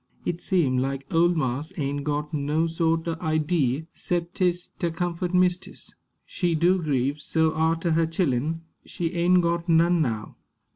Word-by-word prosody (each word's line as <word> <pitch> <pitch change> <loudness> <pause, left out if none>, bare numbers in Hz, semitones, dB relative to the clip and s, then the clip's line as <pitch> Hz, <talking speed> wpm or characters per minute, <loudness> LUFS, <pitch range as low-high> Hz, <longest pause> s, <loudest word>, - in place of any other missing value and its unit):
It 175 0 -2
seem 145 -9 +2
like 135 +1 -2
ole 170 +1 +5
marse 140 0 -2
ain' 145 -1 -2
got 150 +1 -3
no 150 +2 0
sort 165 0 0
o' 165 -1 -2
idee, 155 -3 0
'cep 175 0 -2
'tis 180 -1 0
ter 170 - 0
comfort 175 +1 -2
mistis. 180 0 0 0.3
She 175 -3 -1
do 175 +3 +3
grieve 140 -1 -1
so 160 0 +1
arter 165 +2 +1
her 165 0 +2
chillen. 160 -1 -1 0.2
She 165 -2 -3
ain' 180 +1 +4
got 170 0 -1
none 170 +1 +4
now." 115 -7 -3
165 Hz, 155 wpm, -25 LUFS, 150-175 Hz, 0.3 s, ole